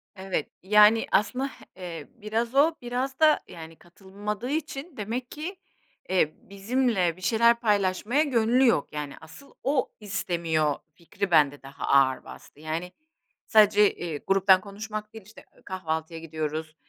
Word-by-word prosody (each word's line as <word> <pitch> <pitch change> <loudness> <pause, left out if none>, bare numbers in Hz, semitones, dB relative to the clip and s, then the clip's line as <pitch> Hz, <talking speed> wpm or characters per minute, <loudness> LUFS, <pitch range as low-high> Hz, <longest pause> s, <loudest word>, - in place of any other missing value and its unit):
Evet. 190 -5 -3
Yani, 210 +3 +6
aslında, 250 +7 +1 0.3
eee, 175 -3 -7
biraz 230 +2 -3
o, 310 +4 +4
biraz 255 +2 -3
da, 310 -1 +5
yani, 165 -1 -10
katılmadığı 200 +7 -7
için 295 0 -4
demek 235 +4 -4
ki, 325 +6 -6 0.5
eee, 180 -5 +2
bizimle 200 -3 0
bir - - -15
şeyler 235 +5 +3
paylaşmaya 210 +4 +1
gönlü 250 -2 +3
yok. 150 -12 +1
Yani, 150 -2 -4
asıl 220 - -14
o 270 -1 0
istemiyor 170 -7 -1 0.2
fikri 175 +3 -5
bende 145 -3 +4
daha 140 +1 -7
ağır 135 -1 +3
bastı. - - -14
Yani, 160 +3 -4 0.6
sadece, 210 -1 +5
eee, 165 -4 -5
gruptan 195 -1 +5
konuşmak 210 +1 -7
değil, 220 -3 -11
işte, 215 - -15
eee, - - -22
kahvaltıya 165 -3 -4
gidiyoruz, 155 -1 -5
200 Hz, 140 wpm, -26 LUFS, 165-235 Hz, 0.6 s, Yani